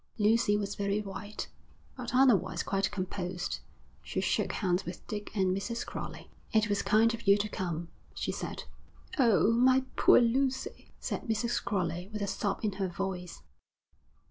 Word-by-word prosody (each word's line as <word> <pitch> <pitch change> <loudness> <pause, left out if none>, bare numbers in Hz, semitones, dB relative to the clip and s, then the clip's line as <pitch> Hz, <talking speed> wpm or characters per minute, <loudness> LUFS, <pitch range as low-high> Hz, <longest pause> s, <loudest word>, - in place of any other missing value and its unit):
Lucy 210 -1 +3
was 205 -1 -2
very 200 +1 0
white, 205 +1 -6 0.5
but 250 -1 -4
otherwise 250 -8 +4
quite 195 0 0
composed. 185 -2 -3 0.4
She - - -3
shook - - 0
hands 185 -2 0
with 175 0 -8
Dick 210 -1 -5
and 190 -2 +2
Mrs. 230 +4 -3
Crowley. - - -7 0.2
'It 215 -1 +3
was 205 -1 +1
kind 225 +2 +4
of 230 -1 -7
you 200 0 +7
to 205 +1 -1
come,' 175 -4 -3 0.3
she - - -2
said. - - -5 0.6
'Oh, 230 -3 +5
my 255 +3 +4
poor - - +7
Lucy,' 260 +2 0
said - - -4
Mrs. 230 +2 0
Crowley, 180 -3 -2
with 210 -1 -3
a - - +1
sob 200 0 -2
in 210 - +1
her 190 - +2
voice. 180 -1 -5
205 Hz, 160 wpm, -31 LUFS, 190-230 Hz, 0.6 s, you